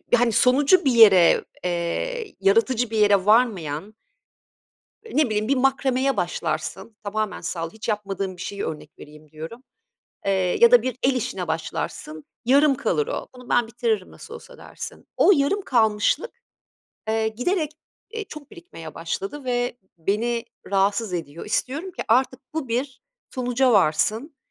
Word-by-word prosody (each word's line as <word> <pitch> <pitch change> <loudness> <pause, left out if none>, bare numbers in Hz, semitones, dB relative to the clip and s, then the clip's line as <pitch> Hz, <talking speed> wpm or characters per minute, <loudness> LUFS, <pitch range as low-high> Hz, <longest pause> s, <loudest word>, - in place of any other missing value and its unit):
hani 240 -1 +2
sonucu 280 - +4
bir 270 - +4
yere, 205 -7 +6 0.2
eee, 180 - -3
yaratıcı 230 +5 +2
bir 225 - -3
yere 205 -3 +4
varmayan 205 -5 +1 1.1
ne 310 -10 +1
bileyim, 215 -1 -1
bir 275 - +2
makromeye 265 0 +1
başlarsın, 190 +4 -3
tamamen 215 0 -3
sal 165 -1 -4
hiç 220 +4 -9
yapmadığım 195 -3 -3
bir 175 - -8
şeyi 200 +1 -4
örnek 155 - -7
vereyim 150 0 -14
diyorum. 160 +11 -9 0.6
Eee, 195 - +3 0.3
ya 470 0 +8
da - - +7
bir 255 -2 -3
el 265 - +3
işine 195 -7 -3
başlarsın, 155 -1 -4 0.2
yarım 275 +3 +5
kalır 435 - 0
o. - - -4
Bunu 250 -1 -13
ben 240 -1 +2
bitiririm 225 -4 -2
nasıl - - -12
olsa - - -12
dersin. - - -9
O - - +6
yarım 295 +5 +2
kalmışlık, 225 - +1 0.8
eee, 220 0 +1
giderek, 305 - -1 0.4
eee, 450 -1 -5
çok 300 -6 -11
birikmeye 165 - -11
başladı 195 - -5
ve 245 -1 -1 0.2
beni 230 +7 -1 0.3
rahatsız 200 +1 +1
ediyor. 165 -2 -6
İstiyorum 280 - -2
ki - - -5
artık 255 +3 +2
bu 315 -6 -3
bir 255 +2 -3 0.3
sonuca 250 0 +1
varsın. 215 - +1
230 Hz, 145 wpm, -23 LUFS, 195-270 Hz, 1.1 s, ya